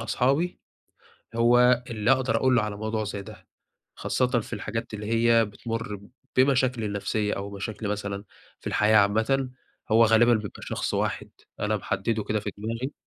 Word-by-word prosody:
أصحابي، 135 +9 0 0.8
هو 120 +1 +5
اللي 110 +1 0
اقدر 130 -4 +3
اقول 130 +2 +3
له 120 - +3
على 105 -1 -3
موضوع 110 +1 -2
زي 100 -1 -5
ده، - - -13 0.5
خاصةً 125 - 0
في 110 - -11
الحاجات 115 +1 -4
اللي 105 0 -5
هي 115 +1 +4
بتمُر 105 0 -5 0.4
بمشاكلي 130 -3 +3
النفسية 105 +1 -1
أو 100 +1 -5
مشاكلي 105 +1 -5
مثلًا 100 0 -3 0.4
في - - -21
الحياة 110 +1 +3
عامةً، 110 +6 +2 0.4
هو 115 +2 +6
غالبًا 115 +2 +5
بيبقى 105 -2 -5
شخص - - -3
واحد - - -2 0.3
أنا 105 +1 +1
محدده 100 +2 -2
كده 105 +1 -1
في 105 - -4
دماغي. 115 +6 -4
110 Hz, 155 wpm, -26 LUFS, 105-120 Hz, 0.8 s, هو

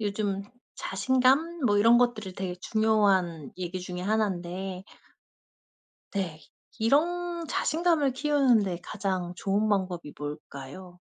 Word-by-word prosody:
요즘 200 -1 -1 0.3
자신감 260 - +1
뭐 205 -2 +3
이런 230 +3 +6
것들이 225 -6 0
되게 185 -2 -3
중요한 195 - +2
얘기 185 0 -4
중에 180 0 -6
1 205 -2 0
데 185 +1 -5 1.3
네. 175 -6 -3 0.4
이런 340 +8 +1
자신감을 320 -4 +1
키우는 265 -4 +3
데 180 -3 -3
가장 185 -4 -3
좋은 205 +2 +1
방법이 185 -6 -1
뭘까요? 150 +4 -8
200 Hz, 225 characters per minute, -28 LUFS, 180-250 Hz, 1.3 s, 이런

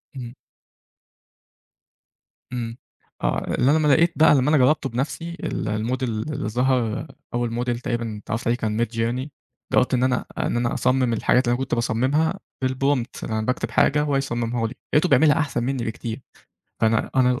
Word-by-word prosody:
إمم. 120 -2 -7 2.2
إمم. 115 -1 -4 0.5
آه. - - 0
أ - - -1
اللي 130 +3 +3
أنا 155 - +4
لمّا 155 -1 +2
لقيت 165 +4 +4
بقى 155 -1 +6
لمّا 135 +2 +2
أنا 155 - +4
جرّبته 140 +3 +3
بنفسي 150 +7 -3
ال - - -3
الموديل 120 +5 -1
اللي 110 0 -3
ظهر 125 +1 0 0.3
أول 120 -1 -1
موديل 120 0 -1
تقريبًا 120 -3 -3
اتعرّفت 115 +1 -3
عليه 120 - +2
كان 110 -3 -2
midjourney. 120 +4 -2 0.4
جرّبت 125 +1 +3
إن 125 - +2
أنا 125 -1 +1
إن - - 0
أنا 120 0 0
أصمّم 130 -1 +2
الحاجات 125 +3 +2
اللي 120 - +3
أنا 120 - -1
كنت 130 - -1
باصمّمها 130 +10 +1 0.3
بالprompt. 130 -1 -1
أنا 110 0 -2
باكتب 125 +4 -2
حاجة 150 +1 +3
وهو 145 -2 0
يصمّمها 120 -3 -1
لي. 120 - -7 0.2
لقيته 155 +4 +4
بيعملها 150 +3 +5
أحسن 140 -6 -1
منّي 130 -1 -1
بكتير. 115 +2 -5 0.6
فأنا 110 0 +2
أنا 125 -1 +3
125 Hz, 170 wpm, -23 LUFS, 115-135 Hz, 2.2 s, بقى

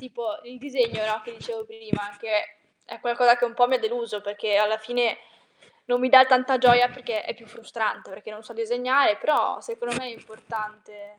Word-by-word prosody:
tipo 255 +4 -7
il 250 +1 -14
disegno, 250 -5 -1
no, 215 0 -2
che 235 - -11
dicevo 450 - -8
prima, 440 - -6
anche 210 0 -3 0.3
è - - -12
qualcosa 240 0 +4
che 245 - 0
un 235 -1 -4
po' 245 0 +4
mi 260 - +3
ha - - -6
deluso, 230 -2 -4
perché 205 0 -2
alla 210 +1 +2
fine 240 +1 -1 0.7
non 245 0 0
mi 255 - +1
dà 260 0 +10
tanta 255 0 +3
gioia, 245 0 +6
perché 245 -4 -5
è - - -5
più 230 -1 -20
frustrante, 220 -1 -5
perché 205 +2 -11
non 215 +1 -12
so 235 - -13
disegnare, 245 +1 +2
però 300 - 0
secondo 350 - -6
me 250 +1 -4
è 240 - -8
importante. 215 -2 -11
240 Hz, 200 wpm, -24 LUFS, 215-255 Hz, 0.7 s, dà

